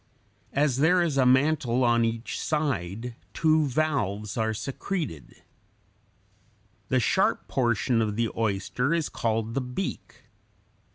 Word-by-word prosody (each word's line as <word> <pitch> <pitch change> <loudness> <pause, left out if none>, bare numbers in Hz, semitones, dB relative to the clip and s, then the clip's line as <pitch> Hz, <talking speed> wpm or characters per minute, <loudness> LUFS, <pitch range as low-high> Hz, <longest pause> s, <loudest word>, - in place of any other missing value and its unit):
As 140 -2 +2
there 175 +5 +4
is 160 -5 -1
a 130 -2 +4
mantle 130 -2 +3
on 120 -1 +3
each 115 0 -2
side, 120 - -2 0.2
two 155 -1 +3
values 110 -8 -1
are 110 -1 0
secreted. 135 - -5 1.5
The 130 - +3
sharp 120 - +1
portion 120 -1 +1
of 105 -2 -1
the 115 0 0
oyster 115 - 0
is 165 -3 -1
called 115 0 -1
the 135 - 0
beak. 125 +10 -5
125 Hz, 120 wpm, -26 LUFS, 110-150 Hz, 1.5 s, there